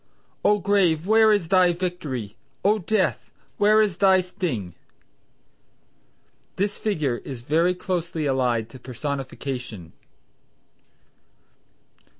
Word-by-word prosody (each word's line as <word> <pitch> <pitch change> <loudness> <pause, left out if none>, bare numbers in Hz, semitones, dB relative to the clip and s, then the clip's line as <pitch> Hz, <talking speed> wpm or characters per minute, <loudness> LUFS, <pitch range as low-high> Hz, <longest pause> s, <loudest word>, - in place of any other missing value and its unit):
"O! 210 - +4
Grave, 180 -5 +2
where 220 +1 +5
is 200 -6 +1
thy 185 -2 +4
Victory, 150 - -4 0.3
O! 210 +2 +4
Death 200 +1 -1 0.3
where 215 +1 +5
is 200 -5 -2
thy 190 -1 +5
sting!" 160 - -4 1.8
This 200 +1 -1
figure 155 - -1
is 125 -2 -8
very 165 +7 +2
closely 175 -4 -3
allied 125 -5 0
to 130 - -11
Personification. 125 - -6
170 Hz, 100 wpm, -24 LUFS, 130-195 Hz, 1.8 s, where